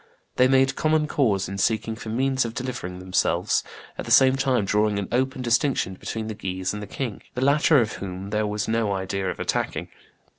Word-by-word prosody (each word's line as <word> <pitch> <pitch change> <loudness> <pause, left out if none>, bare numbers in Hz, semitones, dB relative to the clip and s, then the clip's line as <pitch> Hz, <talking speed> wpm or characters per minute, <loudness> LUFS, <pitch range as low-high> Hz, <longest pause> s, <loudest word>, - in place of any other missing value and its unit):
They 125 - +6
made 135 +1 +3
common 155 0 +2
cause 110 -12 +1
in 100 +1 -5
seeking 110 +2 0
for 110 -1 -8
means 130 +3 +1
of 115 -1 -5
delivering 125 -8 -4
themselves, 90 0 +1 0.4
at - - -4
the - - -7
same 130 0 +6
time 130 -5 +1
drawing 105 +1 +1
an 100 -2 -2
open 130 +1 0
distinction 120 -4 +1
between 110 +4 -5
the 110 - -4
Guises 95 -2 -3
and 105 - -5
the 105 - -7
king, 120 0 -5
the 125 - -2
latter 145 +1 +5
of 110 -3 0
whom 95 +1 -6
there 105 0 0
was 105 0 -2
no 110 -2 +1
idea 95 0 -2
of - - -5
attacking. - - -2
110 Hz, 200 wpm, -24 LUFS, 100-130 Hz, 0.4 s, They